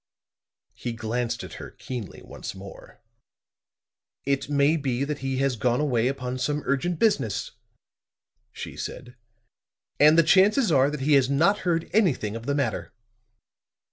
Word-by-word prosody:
He 120 Hz, -, -5 dB
glanced 115 Hz, +1 st, -3 dB
at -, -, -9 dB
her -, -, -8 dB
keenly 120 Hz, -6 st, -8 dB
once -, -, -8 dB
more. 95 Hz, +1 st, -12 dB, 1.3 s
"It 140 Hz, 0 st, -1 dB
may 145 Hz, +2 st, +3 dB
be 135 Hz, -4 st, -1 dB
that 145 Hz, 0 st, -3 dB
he 135 Hz, 0 st, -2 dB
has 135 Hz, -1 st, +1 dB
gone 120 Hz, +2 st, +1 dB
away 125 Hz, -6 st, +1 dB
upon 130 Hz, -1 st, -3 dB
some 145 Hz, +2 st, -1 dB
urgent 160 Hz, +6 st, 0 dB
business," 205 Hz, -, 0 dB, 1.0 s
she -, -, -8 dB
said. 125 Hz, 0 st, -7 dB, 0.8 s
"And 150 Hz, +2 st, +6 dB
the 165 Hz, -, +7 dB
chances 195 Hz, -, +4 dB
are 135 Hz, -1 st, +4 dB
that 150 Hz, -2 st, -5 dB
he 150 Hz, +3 st, +2 dB
has 135 Hz, -2 st, +4 dB
not 170 Hz, +9 st, +3 dB
heard 165 Hz, -1 st, 0 dB
anything 150 Hz, -, +1 dB
of 115 Hz, +2 st, -7 dB
the 140 Hz, -, +1 dB
matter." 140 Hz, -6 st, -2 dB
140 Hz, 145 wpm, -25 LUFS, 125-150 Hz, 1.3 s, the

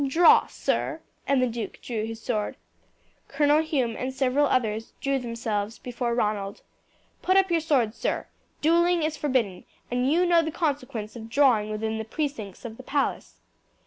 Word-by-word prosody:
Draw, 325 Hz, +5 st, +6 dB
sir!" -, -, -1 dB, 0.3 s
And 275 Hz, -2 st, +3 dB
the -, -, +3 dB
duke 230 Hz, -3 st, -5 dB
drew 220 Hz, -3 st, -3 dB
his 225 Hz, 0 st, -6 dB
sword. 215 Hz, -3 st, -2 dB, 0.7 s
Colonel 295 Hz, +2 st, +3 dB
Hume 265 Hz, -8 st, -1 dB
and 260 Hz, +1 st, -3 dB
several 265 Hz, +2 st, +2 dB
others 225 Hz, -4 st, -1 dB
threw 275 Hz, -1 st, 0 dB
themselves 225 Hz, -3 st, -3 dB
before 240 Hz, -1 st, -3 dB
Ronald. 210 Hz, -3 st, -1 dB, 0.6 s
"Put 370 Hz, +1 st, +3 dB
up 385 Hz, -2 st, +3 dB
your 335 Hz, -, +3 dB
sword, 265 Hz, -9 st, +2 dB
sir. -, -, -2 dB, 0.4 s
Duelling 340 Hz, +2 st, +3 dB
is 310 Hz, 0 st, 0 dB
forbidden, 255 Hz, -11 st, -1 dB, 0.3 s
and 250 Hz, +2 st, +1 dB
you 350 Hz, +3 st, +3 dB
know 345 Hz, -1 st, +5 dB
the 320 Hz, -, -2 dB
consequence 275 Hz, -9 st, -3 dB
of 225 Hz, -1 st, -8 dB
drawing 240 Hz, -5 st, +3 dB
within 220 Hz, +1 st, -2 dB
the -, -, -2 dB
precincts 225 Hz, -, -4 dB
of 225 Hz, -1 st, -7 dB
the 260 Hz, -, -10 dB
palace." 275 Hz, +2 st, -2 dB
255 Hz, 165 wpm, -26 LUFS, 220-295 Hz, 0.7 s, Draw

